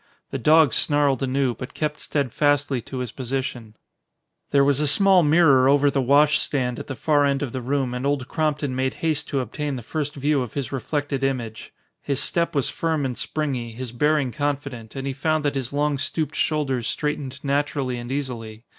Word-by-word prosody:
The 135 Hz, -, -3 dB
dog 155 Hz, +1 st, +5 dB
snarled 145 Hz, -3 st, +2 dB
anew, 135 Hz, -1 st, +1 dB
but 125 Hz, +1 st, -9 dB
kept 150 Hz, -1 st, -2 dB
steadfastly 145 Hz, -1 st, 0 dB
to 130 Hz, -, -8 dB
his 125 Hz, -3 st, -3 dB
position. 125 Hz, -4 st, -4 dB, 0.7 s
There 140 Hz, -1 st, +4 dB
was 140 Hz, 0 st, +3 dB
a 150 Hz, -, +2 dB
small 190 Hz, +4 st, +5 dB
mirror 145 Hz, -5 st, +5 dB
over 145 Hz, 0 st, +4 dB
the 135 Hz, -, +1 dB
wash 145 Hz, +4 st, +4 dB
stand 125 Hz, -4 st, -1 dB
at -, -, -7 dB
the 135 Hz, -, -5 dB
far 145 Hz, +4 st, +2 dB
end 140 Hz, 0 st, +1 dB
of 135 Hz, -, -3 dB
the 130 Hz, -, -4 dB
room 130 Hz, 0 st, -1 dB
and 125 Hz, +1 st, -4 dB
Old 140 Hz, -2 st, 0 dB
Crompton 150 Hz, -3 st, -1 dB
made 130 Hz, 0 st, -1 dB
haste 155 Hz, -2 st, 0 dB
to 140 Hz, -3 st, 0 dB
obtain 145 Hz, +2 st, -4 dB
the 125 Hz, -, -6 dB
first 145 Hz, +3 st, -3 dB
view 145 Hz, 0 st, +1 dB
of 125 Hz, -4 st, -6 dB
his 140 Hz, -3 st, -3 dB
reflected 140 Hz, +1 st, -2 dB
image. 120 Hz, -5 st, -3 dB, 0.3 s
His 140 Hz, -2 st, -2 dB
step 170 Hz, -2 st, 0 dB
was 140 Hz, -, +1 dB
firm 160 Hz, -4 st, -1 dB
and 125 Hz, -2 st, -2 dB
springy, 130 Hz, -7 st, -3 dB
his 125 Hz, 0 st, -6 dB
bearing 145 Hz, +1 st, +1 dB
confident, 140 Hz, -5 st, -3 dB
and 135 Hz, 0 st, -4 dB
he 135 Hz, -, -2 dB
found 155 Hz, +2 st, 0 dB
that 145 Hz, -, +1 dB
his 135 Hz, -3 st, -3 dB
long 145 Hz, 0 st, 0 dB
stooped 155 Hz, +1 st, -2 dB
shoulders 135 Hz, -6 st, 0 dB
straightened 145 Hz, -3 st, -2 dB
naturally 140 Hz, -3 st, -1 dB
and 120 Hz, +1 st, -7 dB
easily. 115 Hz, -5 st, -5 dB
140 Hz, 195 wpm, -23 LUFS, 130-150 Hz, 0.7 s, dog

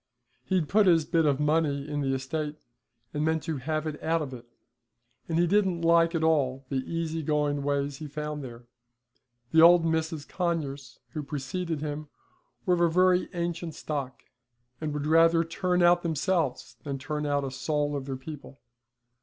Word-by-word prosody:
He'd 185 Hz, -5 st, +1 dB
put 210 Hz, +3 st, +4 dB
his 165 Hz, -3 st, +5 dB
bit 165 Hz, -1 st, +2 dB
of 140 Hz, -1 st, +2 dB
money 150 Hz, -2 st, +1 dB
in 145 Hz, -1 st, -2 dB
the 135 Hz, -1 st, 0 dB
estate 150 Hz, +3 st, -3 dB, 0.6 s
and 150 Hz, -, -1 dB
meant 160 Hz, -1 st, +1 dB
to 160 Hz, -1 st, -3 dB
have 155 Hz, +4 st, -2 dB
it 155 Hz, -1 st, -5 dB
out 165 Hz, 0 st, +1 dB
of 135 Hz, -3 st, -7 dB
it, 120 Hz, -1 st, -10 dB, 0.8 s
and 165 Hz, -, 0 dB
he 175 Hz, -, +4 dB
didn't 185 Hz, -2 st, +1 dB
like 165 Hz, 0 st, +4 dB
at 160 Hz, -, 0 dB
all 135 Hz, -4 st, +1 dB
the 130 Hz, -2 st, -1 dB
easy 165 Hz, -1 st, -2 dB
going 150 Hz, -1 st, 0 dB
ways 140 Hz, 0 st, -1 dB
he 155 Hz, -, -7 dB
found 150 Hz, 0 st, -5 dB
there. 120 Hz, -2 st, -9 dB, 0.9 s
The 160 Hz, -, +6 dB
old 170 Hz, 0 st, +7 dB
Misses 160 Hz, -2 st, -1 dB
Conyers 145 Hz, -8 st, -3 dB, 0.2 s
who 155 Hz, -, -3 dB
preceded 150 Hz, +3 st, -4 dB
him 150 Hz, 0 st, -4 dB, 0.6 s
were 180 Hz, -, +3 dB
of 175 Hz, -, +1 dB
a 170 Hz, -, +4 dB
very 180 Hz, +2 st, +3 dB
ancient 170 Hz, -1 st, -3 dB
stock, 140 Hz, -4 st, -5 dB, 0.6 s
and 155 Hz, -1 st, -2 dB
would 145 Hz, 0 st, -3 dB
rather 165 Hz, +1 st, +5 dB
turn 180 Hz, +2 st, 0 dB
out 175 Hz, 0 st, +5 dB
themselves 165 Hz, -3 st, -1 dB
than 140 Hz, -2 st, -3 dB
turn 150 Hz, +2 st, -3 dB
out 145 Hz, -1 st, +1 dB
a 135 Hz, -, -3 dB
soul 145 Hz, +2 st, -1 dB
of 135 Hz, -2 st, -4 dB
their 135 Hz, -1 st, -4 dB
people. 140 Hz, -1 st, -10 dB
155 Hz, 180 wpm, -28 LUFS, 145-165 Hz, 0.9 s, old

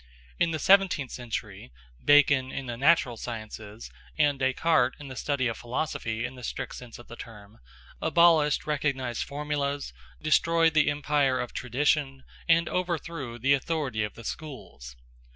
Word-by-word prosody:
In -, -, +3 dB
the 160 Hz, -, -2 dB
seventeenth 185 Hz, -5 st, +3 dB
century, 120 Hz, -, -6 dB, 0.3 s
Bacon 140 Hz, -3 st, +5 dB
in 135 Hz, -, -5 dB
the 120 Hz, -1 st, -4 dB
natural 135 Hz, -2 st, +3 dB
sciences, 110 Hz, -2 st, -8 dB, 0.3 s
and 145 Hz, -3 st, +2 dB
Descartes 130 Hz, 0 st, +2 dB
in 145 Hz, -2 st, -9 dB
the 130 Hz, -, -8 dB
study 140 Hz, -1 st, -1 dB
of 115 Hz, -2 st, -2 dB
philosophy 120 Hz, -2 st, -3 dB
in 125 Hz, -, -6 dB
the 125 Hz, -1 st, -12 dB
strict -, -, -5 dB
sense 125 Hz, -2 st, -10 dB
of 120 Hz, -, -14 dB
the 120 Hz, -, -10 dB
term, 105 Hz, -3 st, -12 dB, 0.4 s
abolished 165 Hz, -4 st, +4 dB
recognized 135 Hz, -5 st, -1 dB
formulas, 145 Hz, 0 st, -3 dB, 0.3 s
destroyed 165 Hz, +1 st, +3 dB
the 155 Hz, -1 st, +4 dB
empire 145 Hz, -2 st, +1 dB
of 125 Hz, -, -4 dB
tradition, 135 Hz, +1 st, 0 dB, 0.3 s
and 165 Hz, 0 st, +4 dB
overthrew 165 Hz, -8 st, -3 dB
the 135 Hz, +4 st, +3 dB
authority 140 Hz, -5 st, -1 dB
of 105 Hz, -, -5 dB
the 115 Hz, -, -11 dB
schools. 110 Hz, -, -8 dB
135 Hz, 150 wpm, -27 LUFS, 120-150 Hz, 0.4 s, Bacon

